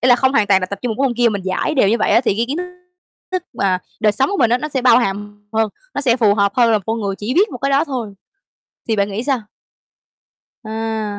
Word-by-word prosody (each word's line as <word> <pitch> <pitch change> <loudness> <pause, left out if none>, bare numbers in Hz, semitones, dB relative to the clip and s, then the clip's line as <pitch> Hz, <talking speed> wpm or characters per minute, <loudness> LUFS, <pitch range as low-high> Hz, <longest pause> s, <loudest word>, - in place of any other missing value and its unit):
ý 250 - +2
là 245 - +7
không 265 +1 +2
hoàn 220 -7 +3
toàn 195 -1 +4
là 185 - -2
tập 200 +1 -6
trung 245 - -1
một 270 - -1
cái 275 - +3
môn 240 - -3
kia, 240 -1 +4
mình 200 -3 -3
dải 190 +10 -1
đều 255 -8 +3
như 230 +3 +2
vậy - - +1
á - - +5
thì 235 - 0
cái 230 - +1
kiến 285 - -2
thức 360 - -3 0.7
thức 370 -1 -1
mà 190 -5 0 0.2
đời 215 -1 +3
sống 265 +6 0
của 405 - -1
mình 230 - +3
á 245 - +3
nó 300 - -4
sẽ 270 -3 -2
bao 245 -2 +6
hàm 205 -2 -4
hơn, 220 0 +1 0.3
nó - - -1
sẽ 250 -4 +2
phù 215 -5 +3
hợp 200 -1 +1
hơn 235 -2 +4
là 215 - +3
một 195 - -15
con 225 +1 -2
người 200 -2 -2
chỉ 225 +6 -3
biết 405 +5 +3
một - - -7
cái 275 +2 -1
đó 280 +4 +3
thôi 245 -8 -5 0.7
thì 225 - +1
bạn 200 0 0
nghĩ 210 +4 -3
sao? 270 -2 0 1.3
À, 220 -1 -3
230 Hz, 290 wpm, -18 LUFS, 205-255 Hz, 1.3 s, là